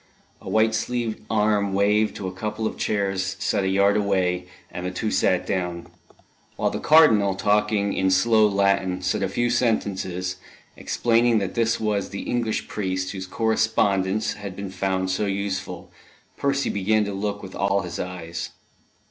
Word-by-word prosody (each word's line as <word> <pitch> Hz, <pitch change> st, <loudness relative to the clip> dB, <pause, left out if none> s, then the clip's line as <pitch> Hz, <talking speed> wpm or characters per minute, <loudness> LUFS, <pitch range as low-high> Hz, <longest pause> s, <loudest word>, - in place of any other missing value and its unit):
A -, -, -8 dB
white 110 Hz, 0 st, +3 dB
sleeved 115 Hz, 0 st, -2 dB
arm 105 Hz, -2 st, +1 dB
waved 105 Hz, +2 st, +2 dB
to 95 Hz, -, -5 dB
a 95 Hz, -, -5 dB
couple 105 Hz, +3 st, -4 dB
of -, -, -2 dB
chairs 95 Hz, -2 st, -1 dB
set 100 Hz, -, 0 dB
a -, -, 0 dB
yard 100 Hz, +1 st, +3 dB
away, 95 Hz, -3 st, 0 dB, 0.2 s
and 90 Hz, -, -6 dB
the 90 Hz, -, -2 dB
two 100 Hz, +4 st, -3 dB
sat 90 Hz, -, +2 dB
down. 90 Hz, -2 st, -2 dB, 0.7 s
While -, -, 0 dB
the -, -, -3 dB
Cardinal, 110 Hz, -12 st, +5 dB
talking 105 Hz, 0 st, +1 dB
in 95 Hz, -, +1 dB
slow 110 Hz, +3 st, +4 dB
Latin, 100 Hz, -2 st, +1 dB
said -, -, 0 dB
a -, -, 0 dB
few 120 Hz, 0 st, 0 dB
sentences, 95 Hz, -6 st, -1 dB, 0.4 s
explaining 115 Hz, 0 st, +2 dB
that 100 Hz, -3 st, -2 dB
this 115 Hz, -1 st, +1 dB
was 105 Hz, -3 st, -1 dB
the 100 Hz, -, -6 dB
English 115 Hz, -3 st, -2 dB
priest 95 Hz, -2 st, -2 dB
whose 95 Hz, -2 st, -6 dB
correspondence 110 Hz, -2 st, +1 dB
had 100 Hz, -3 st, -8 dB
been 100 Hz, -1 st, -6 dB
found 95 Hz, 0 st, -1 dB
so 100 Hz, +3 st, 0 dB
useful, 100 Hz, 0 st, -4 dB, 0.4 s
Percy 140 Hz, 0 st, 0 dB
began 105 Hz, +2 st, +1 dB
to 100 Hz, -, -4 dB
look 105 Hz, +1 st, -3 dB
with 95 Hz, -, -9 dB
all 100 Hz, 0 st, +1 dB
his 85 Hz, -1 st, -6 dB
eyes. 90 Hz, -2 st, -5 dB
100 Hz, 165 wpm, -24 LUFS, 95-110 Hz, 0.7 s, Cardinal